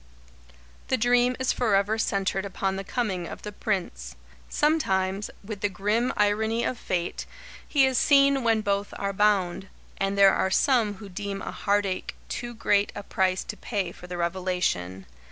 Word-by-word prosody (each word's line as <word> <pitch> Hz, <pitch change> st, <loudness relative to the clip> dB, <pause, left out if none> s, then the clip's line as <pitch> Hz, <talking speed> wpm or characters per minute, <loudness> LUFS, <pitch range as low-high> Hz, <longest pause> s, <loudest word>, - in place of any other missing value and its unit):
The 260 Hz, -, +1 dB
dream 245 Hz, +1 st, +3 dB
is 260 Hz, -, +1 dB
forever 215 Hz, -2 st, +1 dB
centred 195 Hz, -2 st, 0 dB
upon 195 Hz, -1 st, -2 dB
the 195 Hz, -, -4 dB
coming 195 Hz, -6 st, -2 dB
of -, -, -9 dB
The 210 Hz, -, -5 dB
Prince. 175 Hz, -, -3 dB, 0.3 s
Sometimes, 195 Hz, -11 st, +1 dB
with 205 Hz, -1 st, -7 dB
the 205 Hz, -, +1 dB
grim 210 Hz, +6 st, 0 dB
irony 220 Hz, +3 st, +1 dB
of 245 Hz, -, -2 dB
Fate, 175 Hz, -1 st, -3 dB, 0.4 s
he 280 Hz, -3 st, +4 dB
is 260 Hz, -2 st, +2 dB
seen 275 Hz, -2 st, +4 dB
when 225 Hz, -2 st, +3 dB
both 200 Hz, 0 st, -1 dB
are 200 Hz, 0 st, -2 dB
bound 195 Hz, -2 st, +1 dB, 0.3 s
and 195 Hz, 0 st, 0 dB
there 195 Hz, -1 st, +7 dB
are 190 Hz, -, +1 dB
some 220 Hz, 0 st, +2 dB
who 200 Hz, +1 st, -10 dB
deem 195 Hz, +1 st, -5 dB
a -, -, -4 dB
heartache 200 Hz, -2 st, -1 dB
too 240 Hz, 0 st, -5 dB
great 205 Hz, -2 st, +2 dB
a 205 Hz, -, -6 dB
price 190 Hz, -1 st, 0 dB
to -, -, -6 dB
pay 195 Hz, -6 st, -3 dB
for 180 Hz, -, -12 dB
the 180 Hz, 0 st, -5 dB
revelation. 170 Hz, -, -1 dB
200 Hz, 165 wpm, -26 LUFS, 190-225 Hz, 0.4 s, there